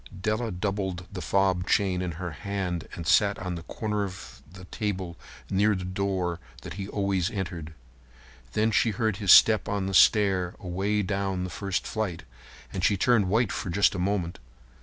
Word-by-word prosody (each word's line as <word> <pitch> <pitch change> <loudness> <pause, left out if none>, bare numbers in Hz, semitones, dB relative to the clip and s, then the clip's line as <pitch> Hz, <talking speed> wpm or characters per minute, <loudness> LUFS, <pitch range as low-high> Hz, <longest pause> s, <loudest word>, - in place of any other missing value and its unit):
Della 110 +4 -1
doubled 95 -2 -3
the 95 -2 -6
fob 95 -2 +1
chain 95 -3 +2
in 90 -2 -3
her 85 +2 -5
hand 90 0 -4
and 85 - -6
sat 100 +3 +4
on 90 -1 -4
the 85 - -5
corner 105 +4 -3
of 95 -1 -8
the 95 0 -11
table 95 -3 -3 0.3
near 105 +2 +2
the 90 -1 -4
door 95 -2 -2 0.2
that - - -7
he 100 +1 -5
always 100 -2 0
entered. 85 -7 -5 0.8
Then 110 +1 +2
she 115 - +3
heard 110 -1 -1
his 100 -4 +3
step 110 -3 +7
on 100 -1 -1
the 95 - -3
stair 95 -2 +4
away 100 +4 -1
down 100 0 -1
on 90 -1 -2
the 90 - -5
first 95 +4 -2
flight, 110 -6 -3 0.5
and 95 - -3
she 100 - +3
turned 105 -2 +3
white 110 +1 +2
for - - -4
just 100 +4 +3
a 95 - -4
moment. 90 -2 -1
95 Hz, 180 wpm, -27 LUFS, 90-100 Hz, 0.8 s, step